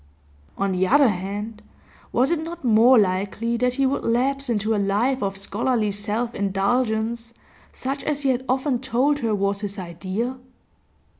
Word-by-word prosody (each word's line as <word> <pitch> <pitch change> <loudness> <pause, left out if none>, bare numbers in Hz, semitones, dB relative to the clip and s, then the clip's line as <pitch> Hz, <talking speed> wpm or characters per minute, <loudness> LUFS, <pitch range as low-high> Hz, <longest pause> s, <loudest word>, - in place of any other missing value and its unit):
On 195 0 0
the 185 0 +1
other 280 +1 +5
hand, 205 +3 -4 0.5
was 260 +5 +2
it 340 - +1
not 330 -2 -7
more 235 +3 +6
likely 200 +4 0
that 250 +1 +1
he 275 - +2
would 270 +1 0
lapse 270 +3 0
into 220 -1 0
a 205 - +1
life 230 +7 +1
of 195 -1 -2
scholarly 215 +2 0
self 210 +4 -2
indulgence, 220 +3 -1 0.4
such 270 +2 -4
as 295 -1 -1
he 275 - +2
had 255 0 0
often 260 0 +1
told 265 +3 +1
her 225 -4 0
was 200 0 -1
his 205 0 -4
ideal? 190 +8 -4
230 Hz, 160 wpm, -23 LUFS, 200-260 Hz, 0.5 s, more